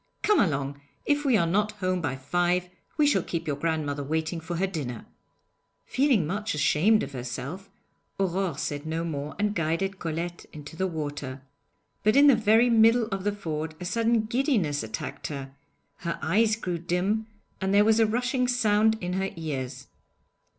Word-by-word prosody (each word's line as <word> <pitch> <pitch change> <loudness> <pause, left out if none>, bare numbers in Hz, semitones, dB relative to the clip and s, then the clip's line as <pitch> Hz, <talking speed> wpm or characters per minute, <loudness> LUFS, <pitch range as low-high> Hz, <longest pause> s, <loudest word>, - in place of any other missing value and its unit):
Come 420 -3 +4
along! 140 -6 0 0.2
If 290 0 +1
we 255 -5 +4
are 170 - +2
not 205 +5 +1
home 185 -3 -1
by 135 - -1
five 175 +6 0 0.3
we 300 - +4
shall 290 - +3
keep 170 - -4
your 150 - -1
grandmother 145 -2 -1
waiting 160 +3 -2
for 165 +2 -5
her 185 +3 +1
dinner.' 145 - -5 0.8
Feeling 255 - +2
much 205 +3 -2
ashamed 160 +9 +3
of - - -6
herself, 135 +9 -6 0.5
Aurore 190 -4 0
said 145 +1 -3
no 160 +1 -2
more 150 -3 -4
and 210 0 0
guided 190 +3 -1
Colette 170 +1 -4
into 150 +1 -10
the 190 +3 0
water. 145 -5 -5 0.6
But 215 +3 +3
in 285 +1 +7
the 280 -3 +8
very 225 +2 +4
middle 230 +1 +5
of 195 -1 -3
the 205 - +1
ford 160 -5 -4
a 180 - -6
sudden 230 +4 +2
giddiness 220 - +1
attacked 110 0 -5
her: 135 -2 -6 0.4
her 170 -1 -3
eyes 215 +7 +2
grew 180 -6 -3
dim, 185 +6 0 0.3
and 190 0 0
there 205 +1 +5
was 220 +1 +4
a 225 - +5
rushing 250 +3 0
sound 220 -2 +3
in 180 0 -3
her 190 +1 -1
ears. 145 -6 -5
180 Hz, 170 wpm, -27 LUFS, 155-215 Hz, 0.8 s, the